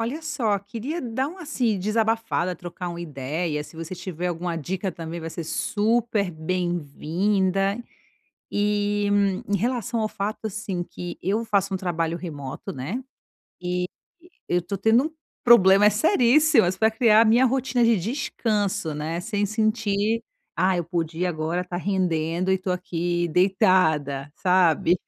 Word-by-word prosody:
Olha 255 +8 -3
só, 270 -10 0
queria 230 - -5
dar 250 +2 -1
uma 360 +3 -10
assim, 250 -8 0
desabafada, 220 -2 0
trocar 175 +1 -6
uma 170 0 -6
ideia, 150 +1 -3
se - - -15
você 165 +2 -6
tiver 180 -1 -4
alguma 175 0 -3
dica 185 +4 -3
também 165 +1 -6
vai 165 - -5
ser 170 - -5
super 215 +3 0
bem-vinda, 180 +4 0 0.8
eh, 205 0 +1 0.4
em 205 - +1
relação 235 +1 -1
ao 215 - 0
fato 210 +2 -3
assim, 195 -4 -4
que 175 0 -7
eu 210 +5 0
faço 200 -2 +1
um 190 - 0
trabalho 170 -2 -1
remoto, 145 -6 -6
né, 150 - -4 0.6
eh, 180 0 -1 0.6
eu 180 0 +1
tô 185 +4 -4
tendo 225 +6 +4
um - - -5 0.3
problema 205 -4 +7
seríssimo, 295 - +4
mas 180 +1 0
pra 220 +3 +3
criar 220 -1 +5
a - - +4
minha 230 +3 +5
rotina 255 -1 +1
de 230 -1 +4
descanso, 210 - -1
né, 155 +3 -3
sem 205 +3 -1
sentir: 215 0 0 0.3
"Ah, 185 0 +2
eu 175 - -1
podia 170 +1 -2
agora 165 +2 -2
tá 180 -1 -5
rendendo 180 -1 0
e 190 - +2
tô 185 0 -4
aqui 175 -1 -1
deitada.", 160 -6 +2
sabe? 180 -2 +3
190 Hz, 150 wpm, -24 LUFS, 175-220 Hz, 0.8 s, problema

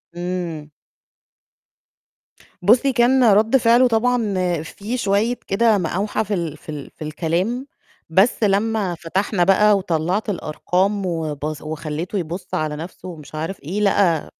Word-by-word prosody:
إمم. 175 -4 -4 1.9
بُصّي، 240 +8 +4
كان 250 +2 +4
رَد 220 +5 +4
فعله 240 +1 +5
طبعًا 230 -2 +1 0.3
فيه 205 +9 -5
شوية 220 +2 +1
كده 220 +2 +3
مقاوحة 195 +4 -1
في 210 0 -4
ال 165 -5 -3
في - - -17
ال 150 -2 -6
في - - -8
الكلام، 175 - -2 0.4
بس 195 +8 +3
لمّا 205 -2 +1
فتحنا 180 +3 -1
بقى 205 +3 +5
وطلَّعت 180 +3 -1
الأرقام 190 +3 -1
وبص 155 -3 -3
وخلّيته 155 +4 -4
يبُص 180 +1 -5
على 155 -1 -1
نَفْسه 165 +4 -8
ومش 155 -3 -10
عارف 165 +5 -4
إيه، 185 +8 -3
لقى 190 -6 +2
190 Hz, 130 wpm, -21 LUFS, 160-215 Hz, 1.9 s, فعله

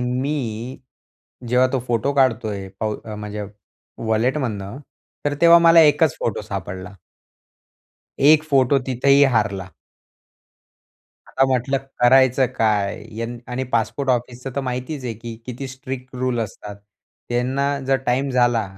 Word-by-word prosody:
मी 125 -1 -3 0.7
जेव्हा 125 +2 +4
तो 135 - +1
फोटो 120 +4 0
काढतोय 110 -7 0
पाउ 110 -1 -1 0.2
म्हणजे 105 0 -6 0.6
वॉलेटमधनं, 110 -2 -1 0.5
तर 145 0 0
तेव्हा 170 0 +8
मला 165 0 +7
1च 155 -1 +4
फोटो 115 - -2
सापडला. 95 -1 -6 1.3
1 155 0 +7
फोटो 140 -2 +3
तिथेही 135 +2 +3
हारला. 100 -3 0 1.6
आता 135 - +1
म्हटलं 135 +1 0 0.2
करायचं 130 +1 +5
काय? 105 -2 0
यं 115 +1 -4
आणि 125 +2 -2
पासपोर्ट 120 +4 -1
ऑफिसचं 125 +1 -2
तर - - +1
माहितीच 130 +2 -4
आहे, 120 - -2
की 115 +1 -8
किती 130 +2 -6
स्ट्रिक्ट 130 0 -8
रूल 125 -1 -1
असतात. 105 -1 -7 0.5
त्यांना 125 +3 0 0.2
जर 135 0 +3
टाईम 130 +3 +1
झाला 120 -3 +2
125 Hz, 120 wpm, -21 LUFS, 110-135 Hz, 1.6 s, तेव्हा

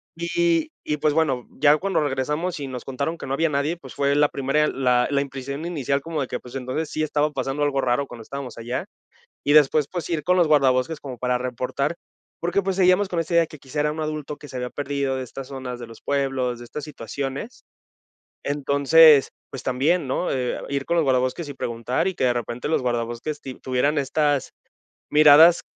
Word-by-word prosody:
Y 170 -1 +1
y 150 - -1
pues 150 - +1
bueno, 140 -6 0
ya 150 +1 +6
cuando 195 +5 0
regresamos 150 +5 -1
y 140 - -4
nos 125 -2 -7
contaron 140 +5 -3
que - - -8
no 135 - -2
había 160 +3 +1
nadie, 145 +3 0
pues 135 -6 -12
fue 140 0 +1
la 145 0 +4
primera 140 +3 +1
la 125 -3 +2
la 140 -1 +1
impresión 140 +2 -5
inicial 140 -5 -1
como 160 0 -3
de 130 - -2
que - - -4
pues 125 +1 -12
entonces 135 +4 -3
sí 155 - -2
estaba 150 0 +1
pasando 135 +1 -2
algo 140 -2 +1
raro 130 +2 0
cuando 120 -3 -10
estábamos 135 0 -7
allá 120 +2 -4 0.6
y 145 - +2
después, 150 -1 +5
pues 175 -2 -4
ir 155 -3 -1
con 180 +1 +3
los 170 -3 +4
guardabosques 140 +1 +3
como 130 -3 -7
para 125 +1 0
reportar, 125 +4 -2 0.5
porque 175 +4 +1
pues 195 -1 -2
seguíamos 185 +1 +4
con 175 -3 -1
esta 165 +1 -3
idea 170 -1 +5
que 155 - -12
quizá 140 +2 -5
era 150 0 +1
un 160 - -5
adulto 155 -1 -4
que 145 - -12
se 130 - -8
había 125 0 -3
perdido 140 -1 -2
de 130 - -3
estas 135 +2 -8
zonas 130 -2 -6
de 120 - -8
los 115 -1 -14
pueblos 135 -3 -1
de 120 - -10
estas 150 +4 -6
situaciones. 140 - -6 0.8
Entonces 145 +1 +5 0.2
pues 135 - -7
también, 140 +6 +1
¿no?, 135 +7 -1
eh, 125 -2 -1
ir 140 -1 -2
con 170 - +1
los 165 - +4
guardabosques 130 +4 0
y 145 - -6
preguntar 120 +7 -2
y 190 - 0
que - - -1
de 125 - +4
repente 120 +2 -4
los 160 - +1
guardabosques 120 +4 -2
ti 130 - -7
tuvieran 130 +5 0
estas 145 0 0 0.6
miradas, 155 +3 +7
140 Hz, 210 wpm, -23 LUFS, 130-155 Hz, 0.8 s, miradas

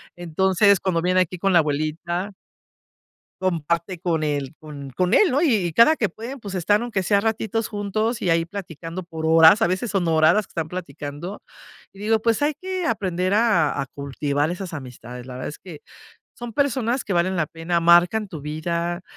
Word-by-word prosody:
Entonces, 190 +3 +2
cuando 175 -3 0
viene 180 +2 +2
aquí 180 0 -2
con 195 +2 +1
la 175 - +7
abuelita 160 +5 -2 1.1
comparte 170 0 -1
con 165 -4 0
él 145 -3 -2
con 145 -3 -9
con 180 - 0
él, 410 -5 +5
¿no? 275 - +2
Y 215 - +2
cada 235 - +6
que 215 - 0
pueden, 235 +8 -8
pues, 200 -3 -6
están 205 +5 +2
aunque 220 -6 -2
sea 200 +2 +3
ratitos 225 +1 -1
juntos 215 +2 -2
y 180 - 0
ahí 165 0 +2
platicando 170 -1 -7
por 160 -2 -5
horas, 165 +6 +7
a - - +4
veces 190 +4 -2
son 185 -4 0
horas 160 0 +4
las 210 -2 0
que - - -35
están 165 -2 -3
platicando. 165 +1 -7 0.5
Y 195 - -15
digo, 220 +2 +2
pues 230 +2 +1
hay 295 +1 +2
que 370 -1 -3
aprender 185 -3 0
a 205 -11 +2
a 135 - -3
cultivar 140 +2 -2
esas 180 0 -5
amistades. 125 -3 -9
La 130 - -8
verdad 130 - -5
es 150 - -11
que 170 -5 -11 0.5
son 240 -1 -8
personas 260 -2 0
que 200 - -3
valen 180 +2 +1
la 165 -4 0
pena, 165 +2 -2
marcan 175 +6 +4
tu 165 -5 -8
vida, 170 +4 -3
180 Hz, 190 wpm, -23 LUFS, 160-210 Hz, 1.1 s, la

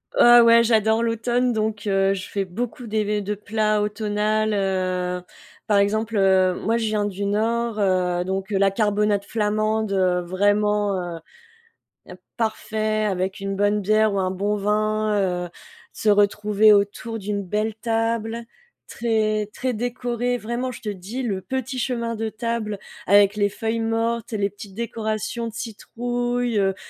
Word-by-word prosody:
Heu, 240 0 +8
ouais, 230 0 +6
j'adore 220 0 +2
l'automne, 240 +2 +1
donc, 215 -1 -2
heu, 195 -1 +2
je 185 -2 -6
fais 200 -1 -2
beaucoup 230 +5 -5
des 210 -1 0
de 205 +1 -3
plats 215 0 0
automnal, 210 +1 0
heu. 185 -2 -1 0.5
Par 210 - +3
exemple, 220 +2 0
heu, 190 -1 +4
moi, 225 +3 0
je 230 - -1
viens 215 -1 0
du 200 0 -3
Nord, 225 +2 0
heu, 180 -2 +1
donc 190 +2 -3
la 195 0 +3
carbonade 205 -1 +1
flamande, 215 0 0
heu, 185 -2 +2
vraiment, 200 -1 0
heu, - - -10 1.2
parfait, 215 -1 -1
avec 190 0 -2
une 195 0 -3
bonne 205 +1 +2
bière 215 +1 +3
ou 200 - 0
un 185 -1 0
bon 200 +3 -1
vin, 215 +1 0 0.3
heu, - - -17 0.4
se - - -5
retrouver 205 +1 +4
autour 205 +3 0
d'une 200 0 -3
belle 210 +3 -2
table, 225 0 -1 0.4
très, 215 -2 0
très 255 -1 -2
décorée, 245 +1 -2
vraiment, 235 +4 -3
je 255 - -10
te 215 - -4
dis, 205 +7 -5
le 195 -5 -2
petit 260 +1 -4
chemin 235 -2 -2
de 225 0 -2
table 225 -2 -3 0.3
avec 200 +1 +5
les 205 -1 +2
feuilles 225 +2 -2
mortes 225 +1 -1
et 215 - -2
les 200 0 0
petites 200 -1 -11
décorations 225 0 -3
de 220 - -7
citrouille, 240 +1 -2
heu, 195 -1 +1
215 Hz, 155 wpm, -23 LUFS, 200-230 Hz, 1.2 s, Heu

